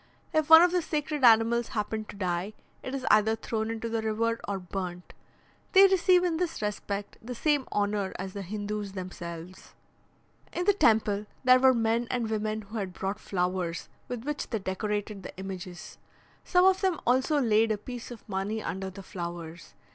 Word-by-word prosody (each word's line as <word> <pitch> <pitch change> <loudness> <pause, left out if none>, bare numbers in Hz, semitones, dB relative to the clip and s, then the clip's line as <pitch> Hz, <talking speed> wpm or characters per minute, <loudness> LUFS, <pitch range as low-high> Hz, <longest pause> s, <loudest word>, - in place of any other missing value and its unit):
If 310 0 +1
one 320 +1 +10
of 355 - +4
the 360 0 +2
sacred 300 -2 -3
animals 230 0 +5
happen 215 0 -3
to - - -10
die, 185 +1 -2 0.3
it 260 - -5
is 260 -1 -4
either 215 +1 +4
thrown 220 0 -3
into 225 0 -3
the 225 -1 -1
river 230 +1 0
or 200 -1 -1
burnt. 180 -1 -6 0.6
They 390 0 +9
receive 370 -1 +4
in 340 -3 +1
this 340 -1 -2
respect 205 -1 -4
the 245 +2 -6
same 290 +1 +1
honour 205 -1 0
as 190 +1 -6
the 200 - -5
Hindoos 205 +1 -4
themselves. 180 -1 -8 0.8
In 355 - -2
the 410 - +5
temple, 215 - +2 0.2
there 255 0 +7
were 260 0 +5
men 230 +1 +1
and 235 -3 -1
women 215 0 -2
who 215 +2 -6
had 190 -3 -4
brought 195 +3 -3
flowers, 180 -2 -2 0.2
with 245 -2 -5
which 295 +1 -4
they 225 - -1
decorated 205 +1 -3
the - - -10
images. 185 -1 -8 0.4
Some 360 0 +4
of 380 0 +4
them 375 -5 +1
also 260 +5 +3
laid 225 -3 +3
a 215 - 0
piece 245 +3 -8
of 240 -3 -11
money 205 +2 -2
under 190 -2 -4
the 195 +1 -10
flowers. 170 -3 -7
215 Hz, 180 wpm, -28 LUFS, 195-250 Hz, 0.8 s, one